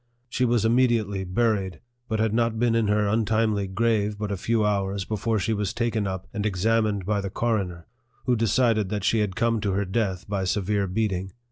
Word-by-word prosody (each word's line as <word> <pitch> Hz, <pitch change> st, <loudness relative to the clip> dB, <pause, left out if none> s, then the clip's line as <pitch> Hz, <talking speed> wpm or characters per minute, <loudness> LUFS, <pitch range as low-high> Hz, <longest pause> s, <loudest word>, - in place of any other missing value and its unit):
She 125 Hz, +1 st, 0 dB
was 120 Hz, -2 st, +2 dB
immediately 115 Hz, -5 st, +2 dB
buried, 95 Hz, -3 st, 0 dB, 0.3 s
but 110 Hz, -2 st, -1 dB
had 110 Hz, -1 st, +1 dB
not 115 Hz, -1 st, +1 dB
been 120 Hz, 0 st, +2 dB
in 115 Hz, -2 st, +2 dB
her 105 Hz, 0 st, +2 dB
untimely 110 Hz, -1 st, +1 dB
grave 105 Hz, +1 st, 0 dB
but 105 Hz, -1 st, -3 dB
a -, -, 0 dB
few 110 Hz, +3 st, 0 dB
hours 100 Hz, -1 st, -1 dB
before 110 Hz, +1 st, -1 dB
she 110 Hz, +2 st, 0 dB
was 105 Hz, 0 st, -2 dB
taken 115 Hz, -3 st, 0 dB
up 95 Hz, 0 st, -4 dB
and 105 Hz, -2 st, -2 dB
examined 105 Hz, 0 st, +1 dB
by 105 Hz, 0 st, 0 dB
the 100 Hz, -, -4 dB
coroner, 95 Hz, -6 st, -2 dB, 0.4 s
who 125 Hz, -1 st, +3 dB
decided 115 Hz, -2 st, +2 dB
that 105 Hz, -1 st, -3 dB
she 110 Hz, +2 st, +2 dB
had 105 Hz, -3 st, -1 dB
come 115 Hz, -1 st, +1 dB
to 100 Hz, -2 st, 0 dB
her 100 Hz, +1 st, 0 dB
death 95 Hz, -2 st, -2 dB
by 100 Hz, -1 st, -2 dB
severe 100 Hz, +1 st, 0 dB
beating. 95 Hz, -2 st, -2 dB
105 Hz, 200 wpm, -25 LUFS, 100-115 Hz, 0.4 s, who